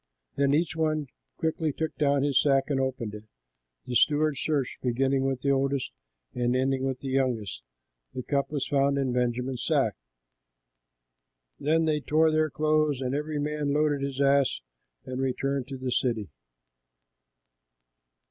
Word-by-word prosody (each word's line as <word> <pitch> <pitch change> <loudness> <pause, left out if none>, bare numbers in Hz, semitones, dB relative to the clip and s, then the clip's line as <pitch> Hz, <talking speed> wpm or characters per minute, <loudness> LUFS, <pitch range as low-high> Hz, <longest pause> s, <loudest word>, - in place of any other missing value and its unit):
Then 140 0 +3
each 165 +1 0
one 155 -3 0 0.3
quickly 160 -1 -1
took 160 +2 -3
down 140 -2 +2
his 140 -2 +3
sack 135 0 +2
and 135 - +1
opened 130 -5 -2
it. 105 0 -9 0.6
The 125 - -5
steward 150 +4 +3
searched, 140 -2 -2
beginning 135 +2 +1
with 135 -2 -1
the 140 - +2
oldest 135 0 0 0.4
and 125 0 0
ending 130 0 +1
with 130 -1 -2
the 135 - -4
youngest; 125 - -1 0.5
and 130 - -3
the - - -33
cup 140 -1 0
was 145 -3 -2
found 140 0 +2
in 135 -3 0
Benjamin's 125 +1 -1
sack. - - +2 1.7
Then 160 +3 +2
they 155 -1 +1
tore 155 +2 +3
their 155 0 +2
clothes, 155 -2 +1
and 130 -1 -2
every 150 +1 -2
man 145 -1 -1
loaded 150 -1 +1
his 140 -1 -3
ass 140 -1 +3 0.4
and 130 +1 -4
returned 135 0 -1
to 135 -1 -6
the 130 -1 -3
city. 115 - -1
140 Hz, 155 wpm, -27 LUFS, 130-150 Hz, 1.7 s, Then